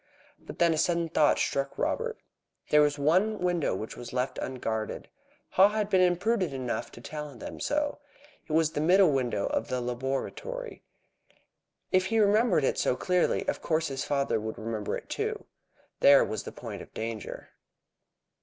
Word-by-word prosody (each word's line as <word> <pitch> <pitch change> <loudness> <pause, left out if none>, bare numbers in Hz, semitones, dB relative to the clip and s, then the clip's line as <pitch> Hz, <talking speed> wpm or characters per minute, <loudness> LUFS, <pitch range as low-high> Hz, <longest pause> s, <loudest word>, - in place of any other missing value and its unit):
But - - -11
then 170 -1 +4
a 155 - -1
sudden 170 -1 +1
thought 155 -2 +3
struck 140 0 -1
Robert. - - -1 0.5
There 150 - +7
was 145 0 +2
one 185 +10 +2
window 175 - 0
which 110 +3 -6
was 120 - -8
left 125 +1 -2
unguarded. 115 -4 -4 0.4
Haw 195 +2 +6
had 210 -1 -2
been 190 -1 +5
imprudent 185 -1 +2
enough 130 -2 -3
to 120 - -11
tell 150 +1 -7
them 115 - -8
so. 295 0 -1 0.5
It 155 - -4
was 160 0 +3
the 150 - -2
middle 180 +1 +5
window 125 -7 0
of - - -1
the 125 - -1
laboratory. 135 - -4 1.1
If 185 0 +3
he 225 - 0
remembered 210 - +4
it - - +1
so - - +2
clearly, 180 +5 +1
of - - -1
course 160 -1 0
his 135 -1 -3
father 140 -5 0
would 110 +1 -5
remember 110 -2 -3
it - - -12
too. - - -3 0.5
There 140 -1 +7
was 110 -2 -4
the - - -6
point - - -8
of - - -12
danger. 110 -1 -5
150 Hz, 170 wpm, -28 LUFS, 125-185 Hz, 1.1 s, There